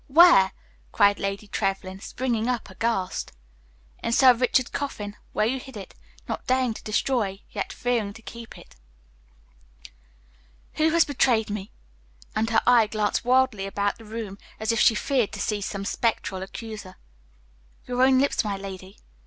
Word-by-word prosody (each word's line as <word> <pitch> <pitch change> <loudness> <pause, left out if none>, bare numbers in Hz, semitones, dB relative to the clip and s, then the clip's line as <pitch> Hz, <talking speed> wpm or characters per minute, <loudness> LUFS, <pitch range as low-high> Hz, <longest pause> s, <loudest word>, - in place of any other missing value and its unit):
Where?" 295 - +7 0.4
cried 205 0 +4
Lady 195 +1 -3
Trevlyn, 195 -2 -2
springing 235 +1 -2
up 240 -5 -2
aghast. 195 -2 -2 0.7
"In 230 - -2
Sir 255 +1 +7
Richard's 250 +1 +1
coffin, 210 -8 -4 0.2
where 215 - +1
you 260 +4 0
hid 260 -2 -10
it, 195 - -9 0.3
not - - -5
daring 255 -2 +2
to - - -10
destroy, 215 -3 -1
yet 200 - -4
fearing 235 -4 -1
to 225 - -13
keep 230 0 -10
it." - - -16 2.0
"Who 315 +1 +4
has 335 +1 +4
betrayed 245 -6 +2
me?" 205 0 -5 0.6
And 225 +1 +1
her 225 -1 +3
eye 240 -3 +6
glanced 210 0 -1
wildly 250 -5 +2
about 200 +1 -1
the 225 - -13
room, 215 -2 -6 0.2
as 220 +1 0
if 230 - 0
she 225 - +5
feared 250 -1 0
to - - -6
see 210 -1 -1
some 195 0 -4
spectral 205 -4 -1
accuser. 210 -1 -8 0.9
"Your 250 0 -1
own 260 0 +6
lips, 280 +2 +2
my 205 -2 -2
lady. 195 0 -9
220 Hz, 155 wpm, -25 LUFS, 200-250 Hz, 2.0 s, Where